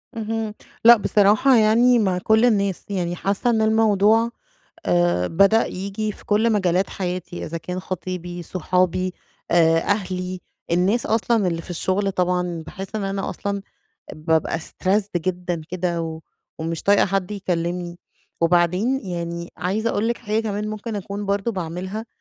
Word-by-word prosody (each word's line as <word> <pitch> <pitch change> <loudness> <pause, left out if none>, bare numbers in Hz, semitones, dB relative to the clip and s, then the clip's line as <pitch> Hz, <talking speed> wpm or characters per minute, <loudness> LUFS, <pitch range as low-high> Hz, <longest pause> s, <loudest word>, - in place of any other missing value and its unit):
اهم، 225 -1 -3 0.3
لأ، 235 +1 +10
بصراحة 210 +5 +4
يعني 230 +3 +5
مع 190 -4 +1
كُلّ 220 +5 +3
الناس، 200 -5 +1
يعني 175 -3 -2
حاسَّة 200 +6 0
إنّ 220 -2 +2
الموضوع 220 +1 +3 0.5
آآ 175 - +2
بدأ 200 - +4
ييجي 200 +3 -3
في - - -14
كُلّ 220 +1 +2
مجالات 185 -2 +1
حياتي، 180 -2 -4
إذا 165 - -4
كان 180 +2 -5
خطيبي 180 -1 -5
صُحابي 185 +1 0 0.4
آآ 165 -1 +5
أهلي، 185 -1 -2 0.3
النّاس 185 +7 +2
أصلاً 225 -2 +1
اللّي 165 -1 -2
في - - -12
الشُّغل 190 +3 0
طبعًا 180 -2 -1
باحِسّ 195 +6 -7
إن 215 - -2
أنا 195 0 -2
أصلًا 200 -1 -3 0.5
بابقى 160 +1 0
Stressed 190 +2 0
جدًا 175 -1 -3
كده، 175 -2 -2
و 160 -1 -5 0.4
ومش 165 0 -3
طايقة 200 0 +4
حدّ 195 0 -1
يكلِّمني، 175 -2 -3 0.4
وبعدين 180 +9 +2
يعني 170 -1 -4
عايزة 210 +6 -1
أقول 220 +1 0
لِك 235 - -1
حاجة 215 -1 -1
كمان 210 0 -3
ممكن 215 +1 -5
أكُون 200 +1 -5
برضه 200 +3 0
باعملها، 185 +4 -5
190 Hz, 145 wpm, -22 LUFS, 175-215 Hz, 0.5 s, لأ